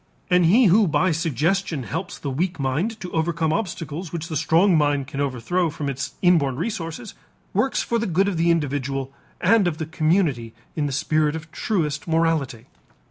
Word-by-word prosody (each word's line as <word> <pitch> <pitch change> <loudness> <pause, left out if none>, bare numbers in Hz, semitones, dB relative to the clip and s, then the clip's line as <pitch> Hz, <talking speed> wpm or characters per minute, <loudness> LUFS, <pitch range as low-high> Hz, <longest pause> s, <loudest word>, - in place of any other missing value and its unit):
And 180 -2 +5
he 230 +8 +5
who 200 +2 +5
by 180 +3 +2
suggestion 165 0 0
helps 165 +9 -5
the 140 - -4
weak 170 +5 -2
mind 160 - -1
to 180 - -6
overcome 160 -1 0
obstacles 170 -3 -4
which 165 0 -5
the 160 - -4
strong 165 +5 +3
mind 145 -3 +2
can 140 +1 -5
overthrow 145 +7 0
from 145 -1 -4
its 135 0 -5
inborn 160 -8 +3
resources 185 - -4 0.4
works 230 +7 +1
for 235 - 0
the 230 - -1
good 190 +3 +2
of 200 - -1
the 170 +1 +2
individual 140 -4 -1 0.3
and 205 +1 +4
of 160 -3 -1
the 160 - -3
community 155 - 0 0.2
in 150 -2 0
the - - -3
spirit 155 +2 +1
of 160 0 -8
truest 155 -9 -2
morality. 160 -8 0
165 Hz, 180 wpm, -23 LUFS, 145-180 Hz, 0.4 s, And